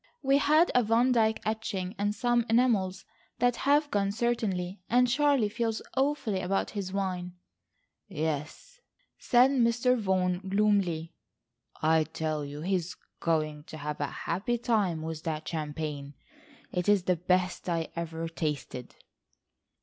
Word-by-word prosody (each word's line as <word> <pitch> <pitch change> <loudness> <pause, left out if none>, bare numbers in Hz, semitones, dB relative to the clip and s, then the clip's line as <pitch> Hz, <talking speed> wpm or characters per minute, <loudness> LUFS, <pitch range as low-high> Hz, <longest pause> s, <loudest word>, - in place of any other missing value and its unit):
"We 275 +1 +4
had 310 +4 +4
a 250 - +5
Van 235 +3 +3
Dyke 220 -2 +2
etching, 205 -4 -2
and 205 +1 0
some 240 0 +2
enamels 215 -6 +2 0.3
that 245 0 +2
have 290 +1 +2
gone 200 -1 +1
certainly, 205 -5 -1
and 250 +2 +4
Charlie 275 -2 +3
feels 225 +1 -2 0.2
awfully 265 -8 0
about 195 +2 -1
his 195 -3 -4
wine." 185 -2 -3 0.7
"Yes," 160 - -4 0.4
said 250 +2 +4
Mr. 245 -1 +3
Vaughan 185 -5 0
gloomily. 195 -5 +1 0.7
"I 160 0 +4
tell 155 -1 -3
you 145 +1 -7
he 185 +4 -1
is 180 -1 -1 0.2
going 155 -2 -1
to 155 - -9
have 150 0 -5
a 145 - 0
happy 195 - -2
time 205 -9 0
with 160 -1 -5
that 160 -2 -4
champagne. 150 -2 -4 0.6
It 180 +2 -1
is 205 -3 +4
the 180 0 +2
best 180 +1 0
I 165 -2 -1
ever 165 -1 -4
tasted." 150 -6 -4
190 Hz, 140 wpm, -29 LUFS, 160-235 Hz, 0.7 s, a